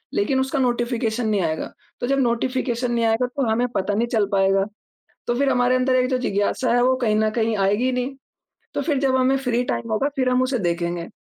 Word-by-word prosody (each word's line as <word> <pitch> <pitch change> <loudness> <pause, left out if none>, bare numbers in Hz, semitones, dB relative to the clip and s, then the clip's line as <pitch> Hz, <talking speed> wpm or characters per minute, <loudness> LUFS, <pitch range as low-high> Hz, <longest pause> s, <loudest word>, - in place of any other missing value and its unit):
लेकिन 280 -10 +1
उसका 265 +1 -1
नोटिफ़िकेशन 240 -2 0
नहीं 205 -2 +1
आएगा। 160 -2 -3 0.3
तो 245 - -1
जब 275 0 +1
नोटिफ़िकेशन 250 0 0
नहीं 235 -1 +1
आएगा 225 +3 +2
तो 270 -5 0
हमें 240 +3 +1
पता 195 +2 0
नहीं 235 +2 +1
चल 220 -3 +1
पाएगा। 195 0 +3 0.6
तो 240 - +1
फिर 275 +2 +2
हमारे 250 0 +2
अंदर 255 0 +2
एक 255 0 +2
जो 255 - +1
जिज्ञासा 235 +2 0
है 245 - +3
वो 255 +1 +3
कहीं 215 -2 +2
न 215 0 +2
कहीं 225 0 +1
आएगी 200 +5 +1
ही 260 - +1
नहीं। 250 +2 -2 0.6
तो - - -1
फिर 295 -5 0
जब 265 -2 +2
हमें 260 +1 +3
फ्री 250 -2 0
टाइम 230 -2 -3
होगा 270 +6 +1
फिर 255 -1 +1
हम 250 0 +2
उसे 255 0 0
देखेंगे। 170 -2 -2
245 Hz, 225 wpm, -22 LUFS, 220-255 Hz, 0.6 s, पाएगा